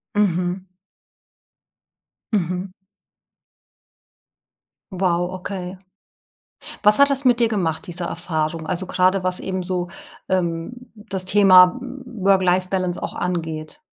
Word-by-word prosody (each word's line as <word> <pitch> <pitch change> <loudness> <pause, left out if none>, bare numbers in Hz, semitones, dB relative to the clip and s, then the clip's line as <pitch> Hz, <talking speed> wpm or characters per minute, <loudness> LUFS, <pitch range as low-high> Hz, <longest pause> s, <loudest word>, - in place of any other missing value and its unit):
Mhm. 180 -2 0 1.7
Mhm. 180 -1 -1 2.2
Wow, 180 -1 0
okay. 185 0 -6 1.0
Was 210 +1 +6
hat 280 0 +6
das 275 0 -1
mit 245 -1 +4
dir 230 -1 +3
gemacht 180 -4 -1
diese 175 0 -4
Erfahrung, 160 -2 -3
also 185 +2 -2
gerade 185 +1 +2
was 185 0 0
eben 185 -1 -3
so, 180 -1 -2 0.4
ähm, 170 0 -1 0.2
das 200 -3 -5
Thema 185 0 +6 0.3
Work 195 -5 +2
Life 185 0 +1
Balance 185 -2 -2
auch - - -4
angeht? 165 - -4
185 Hz, 105 wpm, -21 LUFS, 175-195 Hz, 2.2 s, Was